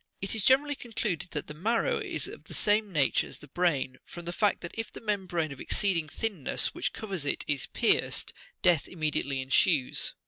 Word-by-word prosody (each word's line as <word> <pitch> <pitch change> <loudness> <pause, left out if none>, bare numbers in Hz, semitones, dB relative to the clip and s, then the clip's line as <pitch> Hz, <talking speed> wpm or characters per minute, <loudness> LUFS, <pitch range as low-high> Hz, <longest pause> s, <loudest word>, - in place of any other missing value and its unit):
It 195 - -1
is 220 -3 +1
generally 280 +4 +4
concluded 215 - -3
that 150 -3 -3
the 150 - -8
marrow 220 +9 +1
is - - -2
of - - -11
the - - -6
same 210 0 +2
nature 145 -6 +2
as - - -9
the 150 - -13
brain, 140 -5 0
from 175 -1 -10
the 175 - -3
fact 205 +1 +2
that 175 - -6
if 225 -1 -4
the - - -9
membrane 185 -7 -1
of 135 - -8
exceeding 175 -7 +1
thinness 200 - 0
which - - -1
covers 195 -7 -4
it 145 - -1
is 145 -3 -1
pierced, - - +1 0.3
death 175 -5 +4
immediately 150 -5 -1
ensues. 135 +1 +2
175 Hz, 195 wpm, -29 LUFS, 150-210 Hz, 0.3 s, generally